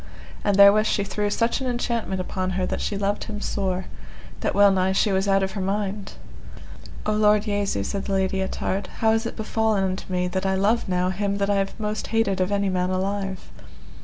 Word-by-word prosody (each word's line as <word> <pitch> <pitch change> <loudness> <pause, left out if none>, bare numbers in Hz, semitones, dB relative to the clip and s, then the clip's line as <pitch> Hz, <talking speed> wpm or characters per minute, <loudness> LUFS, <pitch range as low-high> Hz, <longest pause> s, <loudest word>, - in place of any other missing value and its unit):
And 205 - +2
therewith 200 +2 +7
she 200 - +1
threw 205 +1 -2
such 230 +5 0
an 260 - -2
enchantment 235 -5 -2
upon 185 0 -2
her 185 - 0
that - - -3
she 205 - -2
loved 200 +1 -1
him 210 -1 -6
sore, 190 -3 -2 0.5
that - - -1
well 200 0 +6
nigh 190 0 +1
she 200 +2 +2
was 190 +1 +1
out 195 0 +3
of 190 - -1
her 195 - -4
mind. 200 +1 -2 0.9
O 215 - +1
Lord 210 -1 +4
Jesu, 205 - -1
said 195 - -3
the 200 - -2
Lady 190 0 0
Ettard, 190 0 -2
how 220 -1 +4
is 225 +1 +1
it - - -6
befallen 220 -2 0
unto 185 0 -3
me 180 0 0
that 185 +1 -2
I 190 - +1
love 205 +3 +1
now 180 0 +1
him 200 +1 -1
that 200 0 0
I 200 - +2
have 195 +3 -2
most 210 -1 -3
hated 220 -4 +1
of 185 +2 0
any 200 0 +1
man 180 -1 0
alive? 190 0 -3
200 Hz, 215 wpm, -24 LUFS, 190-210 Hz, 0.9 s, therewith